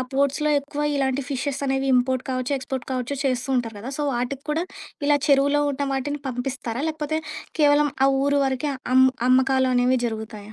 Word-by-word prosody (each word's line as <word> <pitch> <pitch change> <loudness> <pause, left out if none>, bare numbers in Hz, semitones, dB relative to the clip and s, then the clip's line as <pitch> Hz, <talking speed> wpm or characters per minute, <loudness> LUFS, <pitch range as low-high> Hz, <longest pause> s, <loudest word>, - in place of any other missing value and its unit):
ఆ - - +1
పోర్ట్స్‌లో 280 +2 +1
ఎక్కువ 290 +1 -5
ఇలాంటి 270 -1 0
ఫిషెస్ 275 0 -2
అనేవి 270 0 0
ఇంపోర్ట్ 255 +1 +2
కావచ్చు, 255 +1 -2
ఎక్స్‌పోర్ట్ 265 -1 -5
కావచ్చు, 255 +2 -2
చేస్తూ 255 -1 0
ఉంటారు 225 -3 -2
కదా! 240 +6 -6
సో, - - 0
వాటికి 250 +3 -3
కూడా 320 +3 0 0.4
ఇలా 290 - +5
చెరువులో 285 0 +4
ఉన్న 280 0 -2
వాటిని 285 +2 -2
పంపిస్తారా? 250 -1 -4
లేకపోతే 310 0 -2 0.4
కేవలం 290 0 +4 0.2
ఆ - - +5 0.2
ఊరు 285 0 +2
వరకే 265 +2 -1 0.2
అమ్ 260 0 +7 0.2
అమ్మకాలనేవి 255 -1 +3
జరుగుతాయా? 220 -2 -6
265 Hz, 165 wpm, -23 LUFS, 255-285 Hz, 0.4 s, అమ్